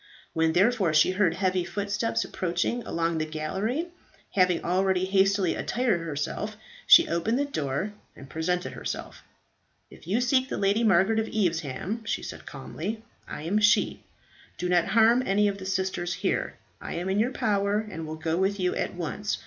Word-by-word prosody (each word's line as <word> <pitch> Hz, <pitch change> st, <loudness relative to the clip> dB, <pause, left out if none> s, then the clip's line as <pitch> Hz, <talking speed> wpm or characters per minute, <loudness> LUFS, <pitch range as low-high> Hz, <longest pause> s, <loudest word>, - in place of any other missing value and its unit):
When, 160 Hz, 0 st, +2 dB
therefore, 190 Hz, -3 st, +3 dB
she 155 Hz, +4 st, +5 dB
heard 185 Hz, -3 st, +2 dB
heavy 185 Hz, -1 st, 0 dB
footsteps 205 Hz, +5 st, -1 dB
approaching 180 Hz, +7 st, -1 dB
along 165 Hz, -1 st, -1 dB
the -, -, +1 dB
gallery 195 Hz, -, -2 dB, 0.4 s
having 180 Hz, -3 st, +2 dB
already 185 Hz, +1 st, +1 dB
hastily 195 Hz, -1 st, +2 dB
attired 235 Hz, -8 st, 0 dB
herself 165 Hz, +7 st, -4 dB, 0.3 s
she 340 Hz, -, +8 dB
opened 210 Hz, +8 st, 0 dB
the 285 Hz, -, +1 dB
door 160 Hz, -, -3 dB, 0.2 s
and 135 Hz, -, -12 dB
presented 180 Hz, +4 st, -2 dB
herself. -, -, -6 dB, 0.7 s
"If -, -, -15 dB
you 205 Hz, +6 st, +1 dB
seek 255 Hz, +1 st, +2 dB
the -, -, -3 dB
Lady 200 Hz, +3 st, +2 dB
Margaret 215 Hz, +1 st, +4 dB
of 220 Hz, -, -1 dB
Evesham," 180 Hz, -, -1 dB
she 210 Hz, -, -2 dB
said -, -, -8 dB
calmly, 185 Hz, +10 st, -6 dB, 0.2 s
"I -, -, -7 dB
am 195 Hz, +6 st, +1 dB
she. 210 Hz, 0 st, +3 dB, 0.6 s
Do 180 Hz, -, -2 dB
not 175 Hz, -1 st, +3 dB
harm 230 Hz, +2 st, +4 dB
any 205 Hz, -1 st, +2 dB
of 200 Hz, 0 st, -2 dB
the 190 Hz, -, -6 dB
sisters 190 Hz, -2 st, -1 dB
here. -, -, -2 dB, 0.2 s
I -, -, -5 dB
am 175 Hz, +2 st, -3 dB
in 190 Hz, +2 st, +1 dB
your 230 Hz, +3 st, +2 dB
power, 200 Hz, -3 st, +1 dB
and 165 Hz, -6 st, -6 dB
will 155 Hz, -, -5 dB
go 160 Hz, +1 st, -2 dB
with 195 Hz, +2 st, 0 dB
you 180 Hz, -1 st, +1 dB
at -, -, -2 dB
once. 180 Hz, +4 st, -3 dB
190 Hz, 175 wpm, -27 LUFS, 170-210 Hz, 0.7 s, she